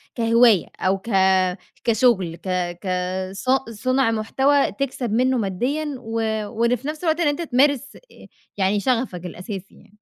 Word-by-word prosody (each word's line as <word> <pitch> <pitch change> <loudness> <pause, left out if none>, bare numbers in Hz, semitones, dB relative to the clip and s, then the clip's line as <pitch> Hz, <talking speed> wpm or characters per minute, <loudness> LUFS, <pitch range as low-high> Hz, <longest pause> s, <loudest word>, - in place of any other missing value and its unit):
كهِواية، 230 -4 +4
أو 190 +1 +1
ك 210 +5 -8 0.7
كشُغل 220 -7 +2
ك 185 - -9 0.3
ك 195 - -6 0.4
ص 195 +6 -6 0.2
صُنع 255 +3 +1
مُحتوى 265 +6 +2
تكسَب 260 -4 -3
منه 255 +2 +2
ماديًا، 245 +10 -1
و 225 - -10 0.4
وإن 235 +3 +1
في 260 +4 -8
نفس 310 +3 -5
الوقت 320 0 +1
إن 335 - +2
أنتَ 290 +3 0
تمارِس 280 -1 +1
آآ، - - -17 0.3
يعني 195 +1 +1
شَغَفك 230 -7 -1
الأساسي 185 +2 -7
يعني. - - -20
235 Hz, 150 wpm, -22 LUFS, 205-270 Hz, 0.7 s, كهِواية